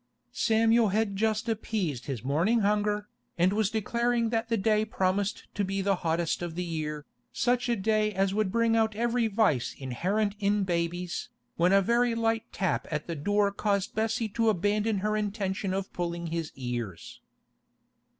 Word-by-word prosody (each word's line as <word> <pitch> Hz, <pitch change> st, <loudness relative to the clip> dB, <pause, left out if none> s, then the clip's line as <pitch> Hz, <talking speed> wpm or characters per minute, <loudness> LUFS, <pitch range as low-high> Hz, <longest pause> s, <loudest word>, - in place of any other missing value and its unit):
Samuel 225 Hz, +1 st, +3 dB
had 205 Hz, 0 st, 0 dB
just 215 Hz, +2 st, 0 dB
appeased 205 Hz, -, -2 dB
his 130 Hz, -6 st, -4 dB
morning 170 Hz, -, +2 dB
hunger, 210 Hz, 0 st, +1 dB, 0.3 s
and 180 Hz, +3 st, +3 dB
was 210 Hz, -1 st, +1 dB
declaring 235 Hz, +2 st, 0 dB
that 225 Hz, 0 st, -1 dB
the 230 Hz, -, +2 dB
day 215 Hz, +1 st, +2 dB
promised 200 Hz, -1 st, -1 dB
to 205 Hz, -, -1 dB
be 195 Hz, +1 st, -2 dB
the 195 Hz, -1 st, +1 dB
hottest 165 Hz, 0 st, -1 dB
of 170 Hz, -2 st, -4 dB
the 180 Hz, -, -2 dB
year, 155 Hz, -3 st, -4 dB, 0.3 s
such 245 Hz, 0 st, +1 dB
a 235 Hz, -, +3 dB
day 215 Hz, +1 st, +1 dB
as 195 Hz, -1 st, 0 dB
would 210 Hz, -2 st, 0 dB
bring 230 Hz, 0 st, +2 dB
out 220 Hz, -1 st, +2 dB
every 235 Hz, +1 st, +1 dB
vice 150 Hz, -, +1 dB
inherent 190 Hz, -, -1 dB
in 205 Hz, 0 st, +2 dB
babies, 175 Hz, 0 st, -2 dB, 0.3 s
when 175 Hz, +2 st, +3 dB
a 195 Hz, 0 st, +5 dB
very 235 Hz, +3 st, +2 dB
light 225 Hz, -1 st, 0 dB
tap 190 Hz, -3 st, -1 dB
at 150 Hz, -1 st, -3 dB
the 170 Hz, -, -4 dB
door 205 Hz, +6 st, +1 dB
caused 200 Hz, -1 st, -1 dB
Bessie 225 Hz, +1 st, 0 dB
to 225 Hz, +2 st, +1 dB
abandon 210 Hz, +2 st, +1 dB
her 215 Hz, 0 st, +1 dB
intention 200 Hz, -2 st, -2 dB
of 190 Hz, 0 st, -3 dB
pulling 170 Hz, -1 st, -3 dB
his 165 Hz, -2 st, -3 dB
ears. 120 Hz, -8 st, -5 dB
205 Hz, 170 wpm, -28 LUFS, 175-220 Hz, 0.3 s, a